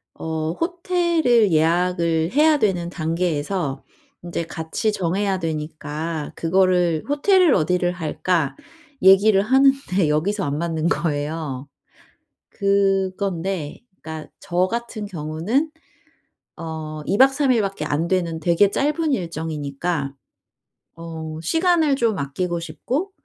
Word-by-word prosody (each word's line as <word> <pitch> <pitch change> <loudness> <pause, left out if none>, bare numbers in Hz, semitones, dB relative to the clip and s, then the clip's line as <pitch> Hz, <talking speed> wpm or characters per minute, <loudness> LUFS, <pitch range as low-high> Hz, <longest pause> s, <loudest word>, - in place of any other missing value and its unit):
어 160 0 -3
호텔을 335 - +2
예약을 165 0 +2
해야 305 +3 +4
되는 180 -5 0
단계에서 165 -3 -2 0.4
인제 170 -1 -3
같이 165 +6 -2
정해야 190 +2 0
되니까 155 -1 -4
그거를 180 -2 +2
"호텔을 355 +2 +4
어디를 175 +2 +1
할까?" 165 -3 -1 0.5
얘기를 195 +1 +6
하는데 265 - +3
여기서 180 +7 0
안 140 +1 -2
맞는 165 -1 -1
거예요. 150 -3 -2 0.8
그건데 195 -4 0 0.2
그러니까 160 -1 -7
저 180 +1 0
같은 235 -1 -4
경우는 185 - -2 0.9
어 155 -2 -6
2 200 - +1
박 270 +2 +6
3 275 -1 +2
일밖에 195 -8 -1
안 155 +3 -1
되는 170 -3 -1
되게 170 +5 +3
짧은 300 +7 0
일정이니까 155 - -3 0.8
어 160 -1 -7
시간을 325 - +2
좀 230 -5 +1
아끼고 170 +5 -2
싶고 240 - -3
175 Hz, 235 characters per minute, -22 LUFS, 160-210 Hz, 0.9 s, 얘기를